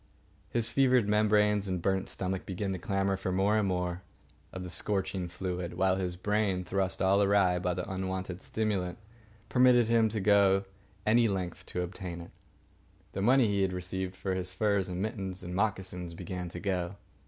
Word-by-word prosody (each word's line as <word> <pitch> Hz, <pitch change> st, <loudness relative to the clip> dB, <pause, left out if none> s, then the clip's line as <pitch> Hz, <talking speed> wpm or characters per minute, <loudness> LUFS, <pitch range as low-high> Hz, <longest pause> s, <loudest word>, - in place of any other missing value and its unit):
His 115 Hz, -1 st, 0 dB
fevered 130 Hz, -5 st, +3 dB
membranes 105 Hz, -1 st, +3 dB
and 90 Hz, -1 st, -1 dB
burnt 95 Hz, +2 st, 0 dB
stomach 95 Hz, 0 st, -3 dB
began 95 Hz, +1 st, -3 dB
to 95 Hz, -, -4 dB
clamour 95 Hz, +1 st, 0 dB
for 95 Hz, -1 st, -3 dB
more 100 Hz, +4 st, +2 dB
and 105 Hz, -, +1 dB
more 90 Hz, -1 st, -1 dB, 0.5 s
of 95 Hz, -, -6 dB
the 90 Hz, -, -6 dB
scorching 95 Hz, 0 st, -1 dB
fluid; 90 Hz, -1 st, -4 dB
while 95 Hz, +1 st, +2 dB
his 90 Hz, -2 st, -2 dB
brain, 100 Hz, -1 st, 0 dB
thrust 95 Hz, +1 st, -1 dB
all 100 Hz, +1 st, +4 dB
awry 100 Hz, -3 st, +3 dB
by 90 Hz, -1 st, -1 dB
the 90 Hz, -, -4 dB
unwonted 95 Hz, -1 st, -4 dB
stimulant, 100 Hz, -5 st, -2 dB, 0.5 s
permitted 125 Hz, -2 st, +5 dB
him 115 Hz, -1 st, +4 dB
to 110 Hz, 0 st, -2 dB
go 100 Hz, -1 st, +4 dB, 0.4 s
any 115 Hz, +2 st, +4 dB
length 95 Hz, -4 st, -3 dB
to 90 Hz, -, -2 dB
obtain 90 Hz, -1 st, -6 dB
it. 85 Hz, -, -10 dB, 0.8 s
The 95 Hz, -, -4 dB
money 125 Hz, +4 st, +5 dB
he 100 Hz, -1 st, +1 dB
had 95 Hz, -1 st, +1 dB
received 90 Hz, +1 st, -4 dB
for 95 Hz, 0 st, -2 dB
his 90 Hz, 0 st, -2 dB
furs 100 Hz, -1 st, +1 dB
and 90 Hz, +1 st, -2 dB
mittens 95 Hz, -4 st, -4 dB
and 90 Hz, 0 st, -6 dB
moccasins 95 Hz, -4 st, -2 dB
began 90 Hz, 0 st, -5 dB
to 90 Hz, -, -7 dB
go. 90 Hz, -1 st, -2 dB
95 Hz, 175 wpm, -30 LUFS, 90-105 Hz, 0.8 s, permitted